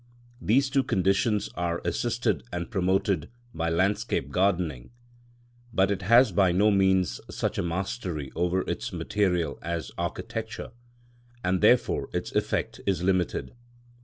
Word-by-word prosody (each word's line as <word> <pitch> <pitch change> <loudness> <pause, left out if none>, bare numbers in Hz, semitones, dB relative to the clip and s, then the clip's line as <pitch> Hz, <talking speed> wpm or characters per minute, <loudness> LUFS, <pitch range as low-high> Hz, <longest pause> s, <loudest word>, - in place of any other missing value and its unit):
These 135 +5 +2
two 135 - +3
conditions 100 -1 +1
are 85 -1 -1
assisted 120 +7 0
and 85 +4 -4
promoted 95 -1 +1 0.2
by 80 0 -1
landscape 90 -4 0
gardening, 85 -8 0 0.8
but 95 -3 +2
it 100 -1 -1
has 115 +7 +5
by 95 -3 +3
no 100 +4 +4
means 95 -2 +2
such - - -2
a - - +2
mastery 85 - -3
over 90 +2 +1
its - - -3
material 90 -7 0
as 85 0 -4
architecture, 110 0 -4 0.7
and 90 -1 +1
therefore - - +3
its - - -3
effect - - -1
is 90 -3 +1
limited. 95 -2 0
95 Hz, 130 wpm, -27 LUFS, 85-100 Hz, 0.8 s, has